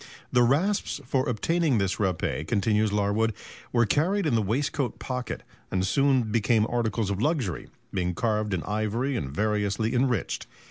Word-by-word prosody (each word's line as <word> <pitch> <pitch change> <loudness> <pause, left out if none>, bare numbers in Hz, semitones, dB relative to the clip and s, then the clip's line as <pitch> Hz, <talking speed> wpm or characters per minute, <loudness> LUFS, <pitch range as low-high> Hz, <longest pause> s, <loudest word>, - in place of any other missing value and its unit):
The 125 - +4
rasps 150 - +1
for 130 +1 0
obtaining 155 +3 +1
this 95 -4 0
râpé, 90 -5 -1
continues 105 0 +2
Larwood, 105 +1 +1 0.4
"were 120 -1 +3
carried 175 - +1
in 150 - +1
the 115 - +3
waistcoat 125 +4 -1
pocket, 125 -2 -4 0.3
and 95 0 0
soon 130 0 +2
became 110 0 +3
articles 115 -3 -1
of 100 +1 -2
luxury, 135 - -1 0.3
being 90 -2 -1
carved 105 -1 0
in 85 - -3
ivory 110 +6 -1
and 70 - -2
variously 105 - 0
enriched. 125 -5 0
110 Hz, 150 wpm, -27 LUFS, 100-130 Hz, 0.4 s, The